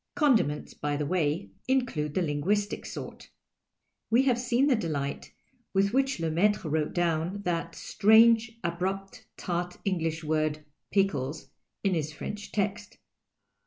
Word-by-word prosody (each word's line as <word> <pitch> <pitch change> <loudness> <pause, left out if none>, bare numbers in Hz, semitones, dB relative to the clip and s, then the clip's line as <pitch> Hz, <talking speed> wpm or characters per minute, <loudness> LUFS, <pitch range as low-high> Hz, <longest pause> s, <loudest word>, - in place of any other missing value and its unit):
Condiments, 235 - +2
by 145 0 -2
the 150 - -1
way, 150 - 0 0.2
include 235 - 0
the 185 - +2
linguistic 180 +8 -1
sort. - - -8 0.8
We 235 +4 +4
have 250 -3 +2
seen 245 +2 +2
the 280 -3 +4
delight 145 -9 -3 0.4
with 200 +2 +3
which 270 +1 +2
Lemaitrc 170 +6 +1
wrote 155 -1 -1
down 175 +3 0
that 170 -1 -2
strange, 225 +2 +4
abrupt, 190 +3 -3
tart 175 0 -3
Englisji 165 -4 -1
word 155 -1 0
" - - -54
j)iekles 155 -7 0 0.2
" - - -56
in 195 -2 +2
his 155 -3 -1
French 205 +7 -6
text. 205 +1 -2
180 Hz, 135 wpm, -28 LUFS, 155-210 Hz, 0.8 s, We